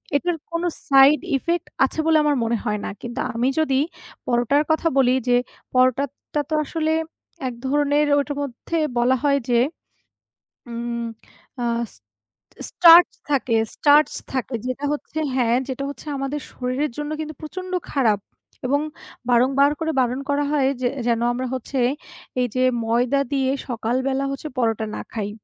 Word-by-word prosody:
এটার 345 +4 +1
কোনো 335 +1 -1 0.2
side 275 +1 +6
effect 340 +5 -2 0.2
আছে 270 - -5
বলে 320 -1 +5
আমার 295 -1 +2
মনে 230 +1 +1
হয় 210 0 -1
না। - - -3
কিন্তু 240 +2 -6 0.2
আমি 240 +2 +1
যদি 275 -4 +2 0.5
পরোটার 245 +4 +2
কথা 315 +1 +2
বলি, 255 -1 +4
যে 245 0 +5 0.4
পরোটাটা 260 +3 +1
তো - - -2
আসলে 315 +1 -1 0.5
এক 250 - -3
ধরনের 290 +1 +2
ওটার 285 0 -3
মধ্যে 280 +4 -4 0.2
বলা 245 +2 +4
হয় 280 -1 +3
যে। 240 -1 +4 1.1
উম 235 0 -3 0.6
আহ 235 0 0
স - - -13 0.7
স্টার্চ 340 0 +8 0.2
থাকে 255 -5 +2 0.2
স্টার্চ 295 +1 +5 0.2
থাকে 260 -1 -2
যেটা 255 +3 -3
হচ্ছে 295 +1 -5 0.2
হ্যাঁ, 240 -2 +2
যেটা 265 +1 -3
হচ্ছে 285 +1 -11
আমাদের 275 +2 -3
শরীরের 255 +4 -2
জন্য 295 0 -3
কিন্তু 310 0 -5
প্রচণ্ড 370 +4 -7 0.2
খারাপ, 230 -7 +2 0.5
এবং 285 +3 +2 0.5
বারংবার 265 +4 +4
করে 320 0 0
বারণ 250 +1 0
করা 285 +1 +1
হয় 280 -3 +3
যে 250 - +2 0.2
যেন 235 -1 +2
আমরা 255 +2 -3
হচ্ছে 260 +2 -4 0.6
এই 250 - +2
যে 255 0 +2 0.2
ময়দা 245 +4 +2
দিয়ে 265 -2 +1 0.2
সকালবেলা 260 +3 -1
হচ্ছে 275 +3 -5
পরোটা 225 -2 +1
না - - -4
খাই। 210 -2 -3
270 Hz, 150 wpm, -22 LUFS, 245-295 Hz, 1.1 s, স্টার্চ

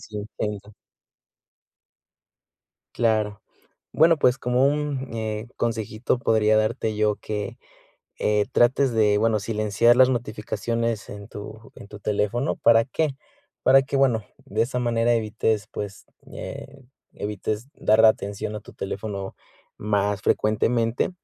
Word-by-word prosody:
Eso 105 - -10
intento. 105 -1 -5 2.2
Claro. 110 -3 +1 0.5
Bueno, 165 +1 +5
pues, 125 -2 +3
como 125 +1 +1
un, 145 -2 -1
eh, 110 0 -4
consejito 115 +1 -1
podría 110 -3 +3
darte 110 0 0
yo 105 -1 +2
que, 105 -1 -5 0.6
eh, 105 -1 +1
trates 125 +1 +3
de, 105 -2 +3
bueno, 110 -1 +2
silenciar 110 +2 +2
las 130 0 +7
notificaciones 115 -1 -2
en 100 -1 -9
tu 110 +2 -10
en - - -11
tu 105 - -10
teléfono, 105 +5 -1
¿para 115 0 +5
qué?, 145 +1 -1 0.5
para 135 +1 +6
que, 135 +1 -3
bueno, 120 -6 +2 0.2
de 110 +3 0
esa 125 +2 -2
manera 120 -1 +1
evites, 110 -2 0
pues, 100 -1 -7 0.3
eh, 135 0 -8 0.3
evites 105 +4 -4
dar 110 +1 +3
atención 105 -1 0
a - - -6
tu - - -14
teléfono 100 0 -5 0.4
más 100 -1 0
frecuentemente. 115 +3 +1
110 Hz, 125 wpm, -24 LUFS, 105-120 Hz, 2.2 s, las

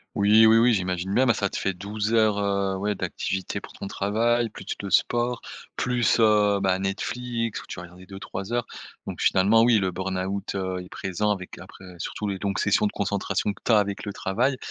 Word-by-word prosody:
Oui, 105 +2 +6
oui, 110 +1 +6
oui. 120 +1 +5
J'imagine 90 0 -2
bien. 130 +2 +4
Ben, 115 - +4
ça 100 -3 0
te - - -5
fait 95 -1 -1
12 105 +3 -3
heures, 110 -2 +3
heu, 100 -1 0
ouais 105 +1 -1
d'activités 95 0 -3
pour - - -12
ton 100 - -7
travail 115 +4 +1
plus 95 - -12 0.2
le 100 - -5
sport, 120 +4 +1 0.4
plus, 120 -2 +1
heu, 105 -2 +4
ben, 95 0 +1
Netflix 115 +3 -3
où - - -15
tu - - -7
vas - - -6
regarder 90 +1 -13
2-3 95 +2 -7
heures. 120 -1 0 0.4
Donc - - -6
finalement, 105 +4 +4
oui, 120 -1 +5
le 95 -2 0
burn-out, 95 +2 -3
heu, 95 -1 -2
est 90 - -12
présent 100 +3 -2
avec 95 -3 -4
après 95 +1 -13
surtout 105 +5 -4
les 100 -1 -2
longues 100 -1 -1
sessions 105 +1 +2
de - - -2
concentration 100 0 -1
que - - -19
tu - - -2
as 110 - +7
avec 100 -1 -1
le 100 - -3
travail. 125 +8 0
100 Hz, 210 wpm, -25 LUFS, 95-110 Hz, 0.4 s, as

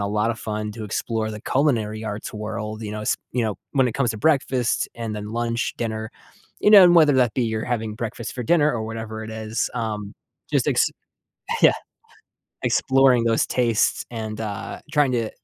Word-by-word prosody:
a 100 - -1
lot 105 +2 +1
of 115 - -10
fun 105 -1 -3
to 110 - -8
explore 110 +1 -2
the 105 -1 -7
culinary 115 -7 0
arts 110 0 -5
world, 110 0 -5
you 105 - -5
know 105 0 -5
s - - +1
you 125 -1 0
know, 110 -2 -1 0.2
when 135 -3 +3
it 120 - -1
comes 125 -4 +1
to 110 - -4
breakfast 130 -4 +1
and 115 -2 -4
then 105 0 -5
lunch, 115 0 -1
dinner, 110 -1 -3 0.5
you 210 - +4
know, 200 -3 +10
and 175 - +6
whether 155 -4 +6
that 125 -3 +3
be 125 - 0
you're 110 -1 -2
having 115 -3 -2
breakfast 115 +1 -5
for 125 - -4
dinner 150 +3 +3
or 115 -5 -3
whatever 110 0 -6
it 110 - -8
is, 110 0 -2
um, 105 -3 -3 0.4
just - - +2
ex - - +4 0.8
Yeah. - - +6 0.9
Exploring 130 -3 +4
those 115 -1 +2
tastes 115 -3 +1
and, 110 -2 -5
uh, 110 +2 -5
trying 145 -4 +3
to, 115 -3 0
115 Hz, 195 wpm, -23 LUFS, 110-125 Hz, 0.9 s, know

